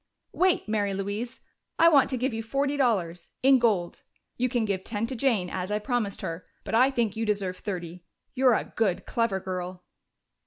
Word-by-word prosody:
"Wait, 370 -8 +2
Mary 205 -2 0
Louise! 205 +5 -4 0.4
I 335 - +6
want 290 -5 +5
to 260 - -1
give 255 +1 -1
you 225 - -2
forty 275 +5 -1
dollars 195 -11 0
in 265 0 +6
gold. 205 -8 +1 0.3
You 250 +1 0
can 240 -3 0
give 195 -3 -2
ten 215 +1 -2
to 255 - -5
Jane, 225 -7 +1
as 185 +2 -4
I 210 - +1
promised 215 -2 -2
her, 165 +2 -4 0.2
but - - -6
I 250 +4 +5
think 235 -6 0
you 225 - -2
deserve 200 -4 -1
thirty. 175 -3 -6 0.3
You're 255 -2 +4
a - - 0
good, 205 -6 0
clever 230 -5 0
girl!" 185 -1 -5
220 Hz, 190 wpm, -27 LUFS, 190-250 Hz, 0.4 s, I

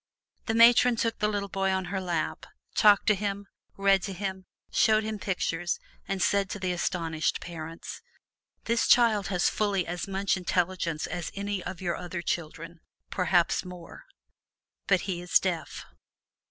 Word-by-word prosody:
The 220 - 0
Matron 235 +1 +6
took 230 0 -1
the 210 - +2
little 205 -1 -2
boy 195 0 -1
on 190 -1 0
her 190 - -1
lap, 175 -3 -3 0.3
talked 205 -2 +5
to 215 - +5
him, 200 0 -3 0.3
read 195 -1 +4
to 195 +1 -4
him, 190 0 -5 0.2
showed 220 0 +4
him 215 -1 -4
pictures 175 -3 -2 0.3
and 195 -1 -1
said 200 -1 +2
to 205 - -5
the 185 -1 -1
astonished 165 -3 -1
parents, 165 -1 -8 0.6
"This 230 0 +1
child 225 -4 +4
has 180 -3 +1
fully 200 -4 0
as 175 +2 -4
much 195 0 0
intelligence 180 -3 -1
as 175 -2 -4
any 200 -1 -3
of 190 - -6
your 175 -2 -1
other 175 -1 -5
children, 165 +1 -4 0.3
perhaps 180 -2 +2
more 180 -2 -11 0.8
but 185 -3 +3
he 180 -3 -3
is 180 - +4
deaf!" 180 -3 -3
190 Hz, 155 wpm, -28 LUFS, 175-200 Hz, 0.8 s, Matron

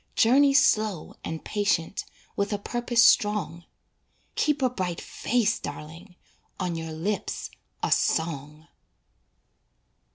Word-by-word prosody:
Journey 275 +4 +5
slow 215 - +2
and 160 0 -5
patient 200 -4 -1 0.3
With 200 +1 -1
a 205 - 0
purpose 240 +2 +1
strong. 190 -7 +3 0.7
Keep 295 -3 +1
a 255 - +4
bright 180 -7 -3
face, 230 -3 0
darling, 165 +6 -9 0.4
On 180 -3 -2
your 160 0 -5
lips 185 +7 -3 0.3
a - - 0
song. 155 -1 0
200 Hz, 105 wpm, -26 LUFS, 165-225 Hz, 0.7 s, Journey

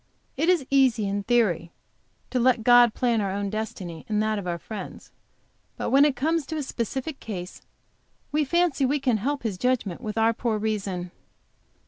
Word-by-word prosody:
It 325 - +1
is 345 -7 +3
easy, 255 -6 +3
in 200 +1 -1
theory, 200 -7 +1 0.6
to 255 - +1
let 245 -2 +3
God 245 -1 +6
plan 235 -3 +1
our 200 - -1
own 200 +1 -2
destiny, 195 -6 -5
and 210 -1 +1
that 215 -1 0
of 185 - -6
our 170 -1 -1
friends. 205 +3 -8 0.7
But - - -3
when 275 +2 +6
it 290 -3 +2
comes 315 +2 0
to 315 - -4
a 300 - -2
specific 265 +4 -4
case 185 -4 -7 0.7
we 300 +1 +2
fancy 340 -1 +1
we 280 +3 +2
can 250 -5 +1
help 275 +6 -2
His 205 -6 -3
judgments 250 -8 0
with 215 -1 -4
our 225 +1 +3
poor 230 -1 -1
reason. 200 -5 -3
230 Hz, 180 wpm, -25 LUFS, 205-265 Hz, 0.7 s, God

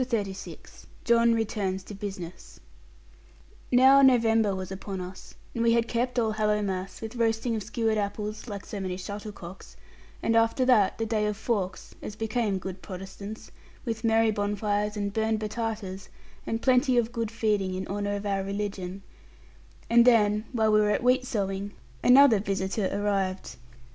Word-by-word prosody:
CHAPTER 235 -4 0
XXXVI 190 - -11 0.2
JOHN 235 0 +4
RETURNS 200 -4 -2
TO 205 - -10
BUSINESS 190 -4 -8 1.1
Now 265 +2 +7
November 225 -6 +4
was 185 0 -6
upon 190 0 -5
us, 185 +1 -9 0.2
and 235 - -1
we 230 0 +4
had 235 0 +2
kept 245 +1 -1
Allhallowmass, 210 -4 -1
with 225 +2 -6
roasting 225 0 +1
of 220 - -2
skewered 220 +1 -1
apples 210 +2 -4
(like 200 -3 -6
so 205 - -6
many 185 -1 -3
shuttlecocks), 200 -2 -8 0.5
and 230 - +2
after 230 +3 +3
that 215 -7 +4
the 225 - -1
day 215 -1 0
of 210 -1 -2
Fawkes, 205 -5 -3
as 210 - -7
became 220 -2 -1
good 185 0 -7
Protestants, 195 +3 -8 0.3
with 225 -1 -3
merry 225 0 +3
bonfires 210 0 -1
and 200 -1 -2
burned 220 0 0
batatas, 215 -3 -4 0.4
and 225 0 -2
plenty 255 0 +3
of 235 -1 +1
good 230 -2 -2
feeding 210 -4 0
in 190 +1 -3
honour 205 +1 -2
of 200 +1 -5
our 195 -1 0
religion; 195 -1 -4 0.8
and 235 0 +6
then 215 -3 +4
while 220 -3 +2
we 215 - +5
were 210 0 +3
at 210 - 0
wheat 255 +1 +3
sowing, 200 -2 -2 0.3
another 250 -3 +7
visitor 195 0 -1
arrived. 195 -7 -1
210 Hz, 160 wpm, -27 LUFS, 195-230 Hz, 1.1 s, Now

